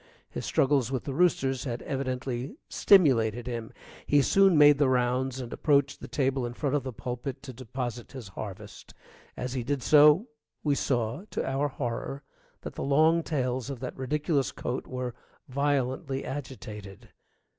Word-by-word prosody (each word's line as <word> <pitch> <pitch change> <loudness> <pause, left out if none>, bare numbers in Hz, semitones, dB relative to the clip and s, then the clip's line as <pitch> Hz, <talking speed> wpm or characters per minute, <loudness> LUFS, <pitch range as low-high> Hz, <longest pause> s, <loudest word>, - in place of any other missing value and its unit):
His - - -5
struggles 135 -3 +2
with 130 -3 -2
the 140 - -4
roosters 135 -5 +1
had 120 -2 -4
evidently 130 - -3
stimulated 120 - +4
him. 115 -2 -5 0.4
He 145 -1 +4
soon 195 -1 +5
made 145 -1 +7
the 140 -3 +4
rounds 125 +1 +1
and 125 -2 -6
approached 140 -2 +2
the - - -7
table 135 -2 0
in 120 0 -4
front 145 0 -1
of 145 - +1
the 130 0 -5
pulpit 125 +3 -5
to 130 -2 -8
deposit 120 -1 -5
his 125 -7 -8
harvest. 95 0 -9 0.4
As 125 0 -3
he 130 -2 -2
did 135 +1 -2
so 150 +6 +6 0.4
we 145 - +2
saw 125 - -1
to - - -2
our 135 +2 0
horror 135 +1 -4 0.4
that - - -7
the - - -6
long 155 +4 +4
tails 130 -5 -2
of 135 -3 -5
that 130 - -5
ridiculous 145 +1 0
coat 125 +2 -4
were 125 -1 -4 0.3
violently 135 0 -1
agitated. 110 -8 -8
130 Hz, 160 wpm, -28 LUFS, 125-145 Hz, 0.4 s, made